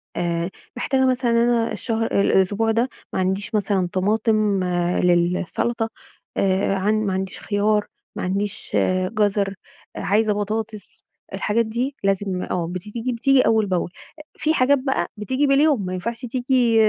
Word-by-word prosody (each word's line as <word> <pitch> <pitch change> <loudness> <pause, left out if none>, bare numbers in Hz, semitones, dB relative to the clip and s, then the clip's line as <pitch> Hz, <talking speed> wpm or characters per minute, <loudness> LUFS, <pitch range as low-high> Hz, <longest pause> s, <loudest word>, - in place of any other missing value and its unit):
آآ، 170 0 -1 0.3
محتاجة 265 +1 +1
مثلًا 255 -2 +1
أنا 230 0 +2
الشهر 225 -1 -1 0.2
الأسبوع 205 +4 +2
ده 235 +4 +1 0.2
ما - - -1
عنديش 190 +3 -1
مثلًا 195 -3 +1
طماطم 210 0 +1 0.4
للسلطة، 180 +6 +1 0.5
آآ، 195 0 +2
عن 200 +3 +1
ما 190 - 0
عنديش 190 0 -3
خيار، 210 0 +1 0.3
ما - - -4
عنديش 200 +3 -2 0.4
جزر، 205 -2 +1 0.4
عايزة 210 +2 +1
بطاطس، 215 0 -4 0.3
الحاجات 215 +4 +1
دي 245 +5 -2
لازم 195 -1 0
آه 170 -2 -2
بت 180 0 -5
تيجي 235 +4 -4
بتيجي 270 +3 +4
أول 220 -2 +3
بأول، 180 -2 -1 0.5
في 310 +1 +1
حاجات 280 0 +3
بقى 265 0 -1
بتيجي 260 +7 0
باليوم 275 -6 +3
ما 185 - -3
ينفعش 230 +7 -4
تيجي 245 -1 +1
210 Hz, 140 wpm, -22 LUFS, 190-235 Hz, 0.5 s, بتيجي